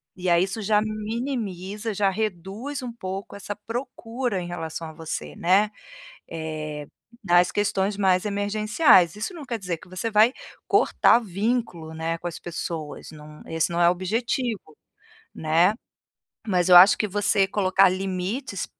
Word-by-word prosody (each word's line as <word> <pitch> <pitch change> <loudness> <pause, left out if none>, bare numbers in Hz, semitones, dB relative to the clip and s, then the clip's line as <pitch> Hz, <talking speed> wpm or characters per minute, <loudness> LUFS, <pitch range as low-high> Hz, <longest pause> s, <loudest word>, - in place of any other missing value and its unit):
e 185 -1 -2
aí 170 +1 +4
isso 195 +3 -4
já 210 +1 +3
minimiza, 215 -2 -4
já 200 0 +2
reduz 215 - -4
um 245 - -5
pouco 195 -3 -6
essa 200 +1 -6
procura 240 -1 -4
em 175 - -6
relação 165 -1 -5
a - - -11
você, 160 0 -6
né, 195 +5 +3 0.6
eh, 155 -2 -5 0.4
nas 175 -1 +4
questões 200 0 0
mais 185 -2 +2
emergenciais, 205 - +3
isso 215 - -4
não 325 - -8
quer 235 -3 -4
dizer 180 -3 -3
que 170 - -17
você 185 +5 -3
vai 215 +3 +5 0.4
cortar 235 - +4
vínculo, 200 -5 -2
né, 165 +1 -3
com 175 - -6
as 165 - -9
pessoas, 165 -2 -6
não 150 0 -13
esse 165 0 0
não 170 - 0
é 170 - +6
o - - +4
objetivo, 215 - -2 0.6
né. 165 +6 +2 0.7
Mas 180 -3 +1
eu 180 - +7
acho 185 +3 +9
que 215 - +1
você 200 0 +2
colocar 195 -1 +3
limites 190 +7 -3
195 Hz, 155 wpm, -24 LUFS, 175-215 Hz, 0.7 s, acho